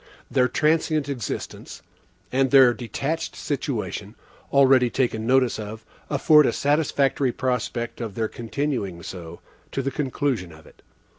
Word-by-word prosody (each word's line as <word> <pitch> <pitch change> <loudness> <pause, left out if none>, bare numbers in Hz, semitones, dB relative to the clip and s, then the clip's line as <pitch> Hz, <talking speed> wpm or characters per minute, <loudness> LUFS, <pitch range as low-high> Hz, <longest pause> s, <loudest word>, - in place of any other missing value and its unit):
Their 125 -2 +3
transient 155 0 +1
existence, 120 -8 -5 0.5
and 135 +1 +2
their 130 -3 +7
detached 135 +7 -3
situation, 115 -7 -4 0.4
already 135 -3 +5
taken 115 -3 -1
notice 130 -3 +3
of, 110 +1 -7 0.2
afford 150 +1 +5
a 115 - +1
satisfactory 140 -2 +1
prospect 125 -2 -2
of 110 -5 -5
their 110 -1 0
continuing 115 - -3
so, 85 -2 -8 0.3
to 135 - -2
the 135 - -1
conclusion 130 - -2
of 80 0 -15
it. - - -19
130 Hz, 130 wpm, -24 LUFS, 110-140 Hz, 0.5 s, their